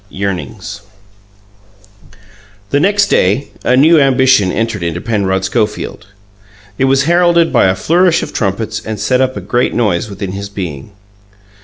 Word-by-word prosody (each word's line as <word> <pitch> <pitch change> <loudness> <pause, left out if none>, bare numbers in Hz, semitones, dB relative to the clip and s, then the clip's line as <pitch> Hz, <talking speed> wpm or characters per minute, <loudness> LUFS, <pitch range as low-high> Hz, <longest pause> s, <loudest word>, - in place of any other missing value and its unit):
YEARNINGS 100 +1 -5 1.9
The 140 - +2
next 200 +5 +3
day 105 +10 +1
a 125 - +2
new 160 +4 +5
ambition 130 -7 +3
entered 115 -1 -2
into 85 0 -3
Penrod 95 -3 -1
Schofield; 105 -1 -3 0.7
it 135 - +3
was 135 +1 +2
heralded 170 +1 +2
by - - +4
a 95 - +1
flourish 170 - +2
of - - -7
trumpets 110 +1 -2
and 110 -2 -5
set 130 0 +1
up 130 0 -1
a - - -5
great 120 0 -1
noise 105 -4 0
within 100 -1 -6
his 100 +1 -6
being. 90 -4 -7
110 Hz, 145 wpm, -14 LUFS, 100-135 Hz, 1.9 s, new